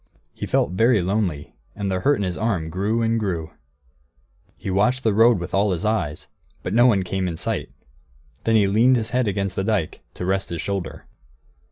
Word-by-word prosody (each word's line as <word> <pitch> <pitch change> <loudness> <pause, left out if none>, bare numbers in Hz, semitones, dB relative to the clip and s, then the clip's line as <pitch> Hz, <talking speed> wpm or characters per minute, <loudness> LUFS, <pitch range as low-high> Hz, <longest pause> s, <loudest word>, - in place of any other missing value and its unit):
He - - -6
felt - - +1
very 115 +4 +3
lonely, 90 -5 -2 0.2
and 100 -1 -2
the 95 - 0
hurt 145 +9 +3
in 105 - -3
his 90 -2 -2
arm 95 -8 -1
grew 105 +6 0
and 115 0 +1
grew. 85 -6 -3 1.1
He 95 - -4
watched 125 +7 +2
the 110 - +2
road 115 +2 +5
with 90 0 -6
all 100 +2 +2
his 85 - -4
eyes, 85 -9 -1 0.4
but 90 - -3
no 120 +3 +6
one 100 -6 +3
came 95 0 -2
in 85 -2 -4
sight. - - -3 0.7
Then 115 - +2
he 105 -2 +5
leaned 115 +6 +4
his 110 -2 -2
head 125 -2 +1
against 100 -1 -2
the 95 - -1
dike, 100 -6 -1
to 90 - -4
rest 95 +1 -1
his 85 - -4
shoulder. 100 -1 -4
100 Hz, 200 wpm, -22 LUFS, 90-115 Hz, 1.1 s, no